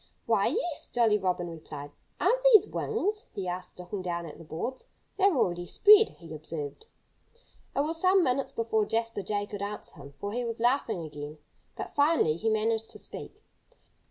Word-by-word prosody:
"Why, - - +3
yes!" 405 -7 -1
Jolly 225 -3 +3
Robin 180 -2 -1
replied. 150 -3 -8 0.3
"Aren't - - +3
these 420 - +7
wings?" 425 -1 -2
he 190 -2 -3
asked, 180 0 -5
looking 180 +2 -5
down 170 -1 -3
at 155 - -10
the - - -10
boards. 170 +12 -5 0.3
"They're 390 -5 +4
already 175 -5 0
spread," 425 - +7
he 165 -2 -10
observed. 155 - -7 0.9
It - - +3
was 325 +3 0
some 375 0 +5
minutes 265 -1 0
before 220 -2 0
Jasper 230 -2 -1
Jay 205 +1 -2
could 205 -1 -7
answer 205 -3 -6
him, 140 -1 -12
for 205 - -3
he 245 +1 -1
was 230 -1 -4
laughing 235 -6 +1
again. 150 0 -7 0.4
But - - -6
finally 285 - +3
he 220 +6 0
managed 220 +1 0
to - - -11
speak. - - -10
210 Hz, 175 wpm, -29 LUFS, 170-270 Hz, 0.9 s, these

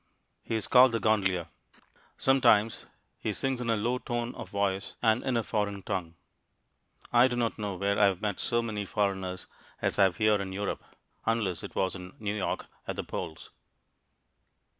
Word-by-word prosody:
He 115 - -3
is 110 - -1
called 130 -1 +7
the 115 - +1
gondolier. 95 -6 +1 0.7
Sometimes 115 -5 +3 0.3
he 110 - -1
sings 130 +3 -1
in 120 - -2
a 115 - +3
low 120 +4 0
tone 120 0 -3
of - - -8
voice 100 -1 -1
and 110 +1 +3
in 130 -2 +1
a 115 - +1
foreign 100 -3 -2
tongue. 90 -5 -3 1.0
I 120 +1 +7
do 125 - -2
not 115 -2 -1
know 100 -2 -2
where 100 +2 0
I 105 - +7
have 95 -3 +2
met 105 -2 -2
so 120 0 +1
many 105 -3 -3
foreigners 95 -2 -1 0.3
as - - -1
I 100 - +8
have 90 -3 0
here 110 -2 +3
in 95 -1 -5
Europe, 100 +1 -3 0.4
unless 110 -6 0
it - - -8
was 95 -1 +1
in 90 -1 -9
New 105 -2 -2
York, 100 - -2 0.2
at - - -2
the - - -3
polls. 85 -4 -6
105 Hz, 180 wpm, -29 LUFS, 95-115 Hz, 1.0 s, I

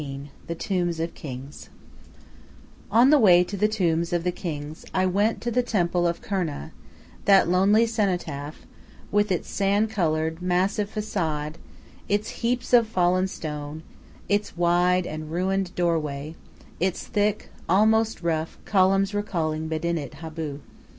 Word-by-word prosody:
XIII 140 0 -7 0.2
THE 170 - -3
TOMBS 175 -2 -1
OF 165 +1 -2
THE - - -17
KINGS 135 0 -8 1.2
On 245 +5 +5
the 300 - +6
way 180 -6 +7
to 200 - -6
the 210 +2 +2
tombs 170 -5 0
of 175 -1 0
the 180 - +1
kings 155 -3 -6
I 185 0 +3
went 205 +5 +1
to 240 - -2
the 250 +2 +2
temple 175 -6 +1
of 170 0 -3
Kurna, 175 - -3 0.5
that 195 -3 +6
lonely 195 +6 +4
cenotaph, 180 -10 -2 0.5
with 205 0 +2
its 180 - -1
sand 205 +2 +1
colored 160 -4 0
massive 190 +3 0
façade, 160 -7 -2 0.5
its 205 +1 0
heaps 245 +1 -1
of 235 -2 +6
fallen 185 -2 +2
stone, 150 -3 -6 0.4
its 205 -3 -1
wide 175 +1 +3
and 155 -1 -6
ruined 190 +2 0
doorway, 155 -4 -1 0.5
its 185 0 -1
thick, 210 0 0 0.2
almost 220 +2 +3
rough, 160 -1 -1
columns 195 0 +3
recalling 160 -6 -2
Medinet 160 -1 -3
Abu. 155 -3 -5
180 Hz, 140 wpm, -25 LUFS, 160-205 Hz, 1.2 s, way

